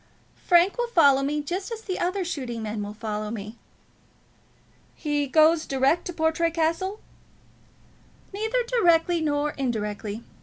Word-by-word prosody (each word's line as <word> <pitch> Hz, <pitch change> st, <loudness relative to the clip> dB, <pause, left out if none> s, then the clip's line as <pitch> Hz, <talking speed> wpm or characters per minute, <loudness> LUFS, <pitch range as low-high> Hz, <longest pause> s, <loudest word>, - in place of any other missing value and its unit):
"Frank 355 Hz, +5 st, +4 dB
will 480 Hz, -, +1 dB
follow 285 Hz, -, +5 dB
me, 295 Hz, +2 st, -1 dB
just 370 Hz, +8 st, -4 dB
as 450 Hz, -1 st, -6 dB
the 370 Hz, -3 st, -4 dB
other 365 Hz, +2 st, -1 dB
shooting 250 Hz, -9 st, -4 dB
men 215 Hz, 0 st, -4 dB
will 205 Hz, +1 st, -6 dB
follow 215 Hz, -1 st, -4 dB
me." 215 Hz, 0 st, -6 dB, 1.4 s
"He 295 Hz, -2 st, -1 dB
goes 315 Hz, +3 st, +4 dB
direct 275 Hz, +5 st, +1 dB
to 355 Hz, -, -5 dB
Portray 320 Hz, +1 st, +1 dB
Castle?" 335 Hz, +5 st, -1 dB, 1.3 s
"Neither 445 Hz, +5 st, 0 dB
directly 350 Hz, -8 st, +3 dB
nor 295 Hz, -1 st, 0 dB
indirectly. 215 Hz, -4 st, -3 dB
315 Hz, 130 wpm, -25 LUFS, 245-355 Hz, 1.4 s, follow